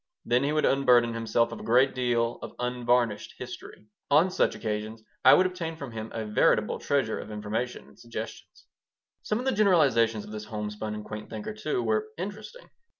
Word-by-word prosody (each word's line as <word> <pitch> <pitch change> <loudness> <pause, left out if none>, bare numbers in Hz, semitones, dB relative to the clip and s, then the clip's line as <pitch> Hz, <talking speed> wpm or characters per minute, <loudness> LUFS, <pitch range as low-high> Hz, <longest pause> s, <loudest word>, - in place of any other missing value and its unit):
Then 125 +2 +2
he 145 - +1
would 155 0 +2
unburden 125 -4 +4
himself 115 +1 +1
of - - -7
a - - -9
great 125 +4 +4
deal 120 -2 0
of - - -8
unvarnished 125 -2 0
history. - - -9 0.2
On 160 +6 +5
such - - +1
occasions 110 0 -4 0.2
I - - +9
would 185 - +4
obtain 175 -3 -3
from 140 -5 -7
him 110 0 -6
a 110 -1 -4
veritable 105 0 +2
treasure 135 -6 0
of - - -8
information 110 +4 -4
and - - -20
suggestions. 115 -1 -8 0.6
Some 210 - -1
of 250 - -4
the 265 - +2
generalizations 135 - +3
of - - -11
this 105 0 -6
homespun 105 0 -4
and 105 - -7
quaint 105 0 -7
thinker, 110 -1 -5
too, 120 +3 -2
were 110 +4 0
interesting. 210 - -7
115 Hz, 185 wpm, -27 LUFS, 110-140 Hz, 0.6 s, I